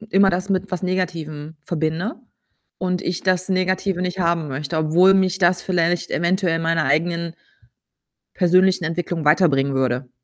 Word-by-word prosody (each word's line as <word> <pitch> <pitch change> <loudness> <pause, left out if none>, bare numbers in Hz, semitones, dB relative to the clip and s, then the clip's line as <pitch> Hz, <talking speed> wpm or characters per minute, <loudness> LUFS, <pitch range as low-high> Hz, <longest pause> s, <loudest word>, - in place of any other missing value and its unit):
hm, 220 - -13
immer 195 0 +5
das 185 +2 -2
mit 195 +1 -1
was 185 0 -3
Negativem 165 -4 -3
verbinde 160 - -2 0.6
und 180 0 -1
ich 175 -2 -3
das 185 0 0
Negative 185 0 0
nicht 180 +1 -3
haben 170 -2 0
möchte, 145 +3 -4
obwohl 170 +5 +4
mich 190 -1 +2
das 175 -1 +3
vielleicht 175 -1 -1
eventuell 175 0 0
meiner 165 0 0
eigenen 170 +4 0 1.0
persönlichen 185 0 +3
Entwicklung 165 0 -3
weiterbringen 145 -4 +3
würde. 130 -1 -1
175 Hz, 145 wpm, -21 LUFS, 160-185 Hz, 1.0 s, immer